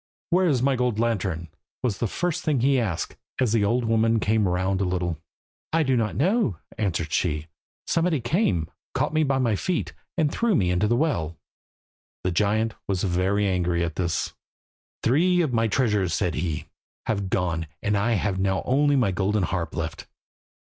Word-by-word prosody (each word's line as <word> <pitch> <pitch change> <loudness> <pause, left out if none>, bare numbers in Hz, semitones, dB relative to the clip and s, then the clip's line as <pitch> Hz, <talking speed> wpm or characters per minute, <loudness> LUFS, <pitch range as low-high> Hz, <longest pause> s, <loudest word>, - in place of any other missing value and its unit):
"Where 180 +1 +4
is 130 -6 +2
my 135 0 +3
gold 125 -3 0
lantern?" 95 -8 -1 0.3
was 115 -6 0
the 115 - +1
first 175 - -2
thing 145 -6 +1
he 135 +1 +3
asked, 100 -9 -2 0.2
as 125 -4 +2
the 110 -3 +3
old 115 +4 +1
woman 115 0 +3
came 105 -1 +2
round 95 +2 0
a - - +3
little. 90 -3 -1 0.5
"I 165 0 +3
don't 120 -6 +1
know," 175 - +2 0.2
answered 85 -8 -1
she. 75 -3 0 0.4
"Somebody 165 -2 +1
came, 120 - +1 0.3
caught - - 0
me 155 - +3
by 135 -3 +2
the 120 -5 +2
feet, 180 - -2 0.2
and 155 -3 +2
threw 230 0 +1
me 90 - +2
into 90 +4 +2
the 120 - +2
well." 85 - 0 0.9
The 90 - +1
giant 110 +5 +1
was 95 -2 -1
very 95 +2 +1
angry 90 -2 +1
at 85 -2 -3
this. 85 -2 -1 0.7
"Three 175 +9 +3
of 150 -7 0
my 115 -1 +2
treasures," 105 -7 +1
said 90 -4 0
he, 80 -1 -2 0.4
"have 100 -4 -1
gone, 85 -4 -1 0.2
and 105 0 +1
I 105 +4 +2
have 100 -2 0
now 95 -1 +1
only 145 +2 +3
my 120 -8 +3
golden 95 +2 0
harp 85 -4 -2
left. - - -4
105 Hz, 175 wpm, -25 LUFS, 90-130 Hz, 0.9 s, Where